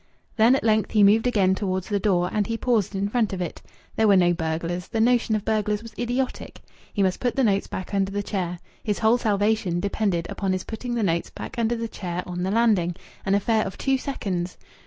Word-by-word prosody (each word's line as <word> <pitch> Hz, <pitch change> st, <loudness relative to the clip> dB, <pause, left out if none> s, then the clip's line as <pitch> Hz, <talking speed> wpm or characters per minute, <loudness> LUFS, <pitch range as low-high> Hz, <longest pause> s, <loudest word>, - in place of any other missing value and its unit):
Then 235 Hz, +3 st, +5 dB
at -, -, -1 dB
length 215 Hz, -1 st, +2 dB
he 210 Hz, -2 st, +5 dB
moved 220 Hz, +4 st, +5 dB
again 195 Hz, -6 st, +3 dB
towards 190 Hz, -2 st, -2 dB
the 205 Hz, -2 st, 0 dB
door; 180 Hz, -3 st, +2 dB
and 210 Hz, -2 st, +1 dB
he 230 Hz, -, -2 dB
paused 225 Hz, -5 st, 0 dB
in 195 Hz, +1 st, 0 dB
front 220 Hz, -1 st, 0 dB
of 190 Hz, -, -3 dB
it. 175 Hz, -, -4 dB, 0.3 s
There 220 Hz, -, +3 dB
were 200 Hz, -2 st, +6 dB
no 175 Hz, -1 st, +4 dB
burglars! 170 Hz, +1 st, -3 dB
The 225 Hz, -, -2 dB
notion 235 Hz, -1 st, +3 dB
of 210 Hz, -, -3 dB
burglars 210 Hz, -1 st, 0 dB
was 230 Hz, -1 st, -10 dB
idiotic! 245 Hz, +2 st, -2 dB, 0.3 s
He 200 Hz, -, 0 dB
must 185 Hz, -1 st, +1 dB
put 245 Hz, -1 st, -1 dB
the 270 Hz, -, +2 dB
notes 200 Hz, -3 st, +2 dB
back 190 Hz, +2 st, -6 dB
under 195 Hz, -1 st, +1 dB
the 205 Hz, +1 st, -2 dB
chair. 180 Hz, -4 st, -3 dB, 0.3 s
His 210 Hz, -2 st, -1 dB
whole 225 Hz, +2 st, +3 dB
salvation 205 Hz, -4 st, +1 dB
depended 195 Hz, -3 st, -1 dB
upon 195 Hz, -2 st, -2 dB
his 185 Hz, -, -2 dB
putting 240 Hz, +2 st, -5 dB
the 230 Hz, -, 0 dB
notes 170 Hz, -3 st, 0 dB
back -, -, -7 dB
under 230 Hz, +1 st, +1 dB
the 230 Hz, 0 st, -3 dB
chair 180 Hz, -4 st, -5 dB
on 180 Hz, 0 st, -5 dB
the 185 Hz, -, -1 dB
landing!... 205 Hz, -6 st, +2 dB, 0.3 s
An 195 Hz, -, +3 dB
affair 220 Hz, +2 st, +2 dB
of 190 Hz, -, -6 dB
two 270 Hz, -1 st, +1 dB
seconds!... 185 Hz, -10 st, -3 dB
205 Hz, 225 wpm, -24 LUFS, 185-225 Hz, 0.3 s, were